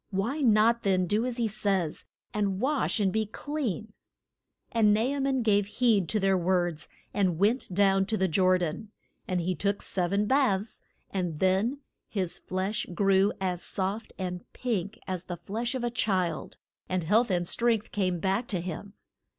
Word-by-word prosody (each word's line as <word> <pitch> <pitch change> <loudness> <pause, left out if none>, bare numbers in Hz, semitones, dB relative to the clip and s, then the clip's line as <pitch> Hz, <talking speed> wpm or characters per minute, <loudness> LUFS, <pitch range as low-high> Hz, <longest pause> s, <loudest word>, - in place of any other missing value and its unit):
Why 220 +9 -1
not 230 -1 +4
then 185 -2 +2
do 210 +7 +1
as 250 -1 -4
he 235 -2 +1
says, 195 -6 -1 0.3
and 200 -2 0
wash 265 -1 +1
and 195 -3 +2
be 220 -1 0
clean? 225 - -4 0.8
And 215 -3 +4
Na 215 - +1
a 275 +4 0
man 270 -2 +1
gave 205 -2 +3
heed 220 -9 +3
to 215 - +1
their 195 -1 +3
words 175 -2 0 0.2
and 185 -5 +1
went 210 +5 +1
down 195 0 +3
to 220 +1 0
the 190 -1 +2
Jor 185 +2 +3
dan. 180 +4 -3 0.4
And 180 -1 0
he 180 +2 0
took 200 +2 -1
sev 180 -2 -1
en 200 +1 +2
baths, 220 -5 +1 0.3
and 180 -5 -2
then 200 +9 +1 0.3
his 185 -5 -2
flesh 190 +3 -2
grew 195 +1 +4
as 180 -2 -1
soft 195 +4 -3
and 180 -1 -4
pink 215 -4 -2
as 185 -1 -3
the 175 -1 -5
flesh 225 +9 -3
of 255 - -3
a 240 - 0
child, 185 -8 -1 0.3
and 185 -1 0
health 220 +8 +3
and 175 -2 0
strength 230 -1 0
came 185 -3 0
back 195 +7 0
to 185 - -1
him. 180 +3 -6
200 Hz, 175 wpm, -28 LUFS, 185-225 Hz, 0.8 s, not